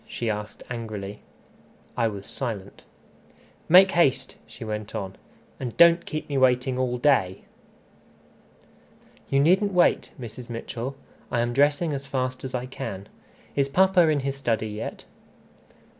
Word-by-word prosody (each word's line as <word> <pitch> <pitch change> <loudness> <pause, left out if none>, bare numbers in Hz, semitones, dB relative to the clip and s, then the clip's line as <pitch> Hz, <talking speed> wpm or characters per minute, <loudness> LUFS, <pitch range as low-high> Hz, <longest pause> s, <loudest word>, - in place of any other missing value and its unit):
she 115 -2 -2
asked 105 0 -6
angrily. 105 -4 -6 0.8
I 115 -2 +2
was 100 -2 -6
silent. 110 -8 -4 0.9
"Make 185 +3 +8
haste," 135 -6 +2
she - - -10
went 105 -1 -5
on, 95 -1 -4 0.4
"and 125 -3 -5
don't 170 0 +6
keep 155 -1 -4
me 140 -2 0
waiting 130 0 +3
all 125 -1 0
day." 110 -9 +2 1.9
"You 135 - +3
needn't 190 +7 +3
wait, 180 -1 +3
Mrs. 120 +1 -9
Mitchell. 120 +3 -5 0.3
I 120 - 0
am 120 0 -1
dressing 145 +4 +2
as 140 0 -5
fast 130 -1 -2
as 130 -1 -4
I 125 0 -2
can. 110 -6 -7 0.5
Is 140 -1 +1
papa 185 +2 +4
in 150 -2 +2
his 135 0 -2
study 115 -5 -1
yet?" 105 +1 -6
130 Hz, 140 wpm, -25 LUFS, 110-140 Hz, 1.9 s, Make